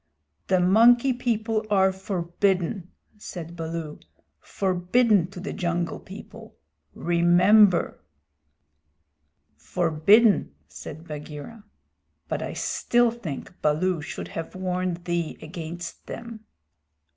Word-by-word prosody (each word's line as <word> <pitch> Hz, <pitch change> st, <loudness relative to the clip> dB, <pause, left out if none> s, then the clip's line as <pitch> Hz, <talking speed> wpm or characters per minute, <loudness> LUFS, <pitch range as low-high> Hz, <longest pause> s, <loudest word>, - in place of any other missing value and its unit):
"The 185 Hz, -1 st, +3 dB
Monkey 235 Hz, +8 st, +5 dB
People 225 Hz, -3 st, -1 dB
are 190 Hz, -2 st, +4 dB
forbidden," 190 Hz, 0 st, -1 dB, 0.3 s
said 170 Hz, -4 st, -8 dB
Baloo, 165 Hz, -2 st, -5 dB, 0.4 s
"forbidden 190 Hz, +1 st, +1 dB
to 185 Hz, 0 st, -10 dB
the 185 Hz, -, -5 dB
Jungle 170 Hz, -3 st, -2 dB
People. -, -, -12 dB, 0.4 s
Remember." 175 Hz, +3 st, +4 dB, 1.6 s
"Forbidden," 170 Hz, -, +3 dB
said 155 Hz, -, -10 dB
Bagheera, 150 Hz, +8 st, -8 dB, 0.6 s
"but -, -, -3 dB
I -, -, -4 dB
still 240 Hz, -1 st, +1 dB
think 180 Hz, -, -8 dB
Baloo 160 Hz, +3 st, +1 dB
should -, -, -7 dB
have 165 Hz, +2 st, -6 dB
warned 180 Hz, -1 st, -2 dB
thee 170 Hz, -2 st, -2 dB
against 170 Hz, +1 st, -8 dB
them." 230 Hz, -2 st, -8 dB
180 Hz, 95 wpm, -25 LUFS, 170-210 Hz, 1.6 s, Monkey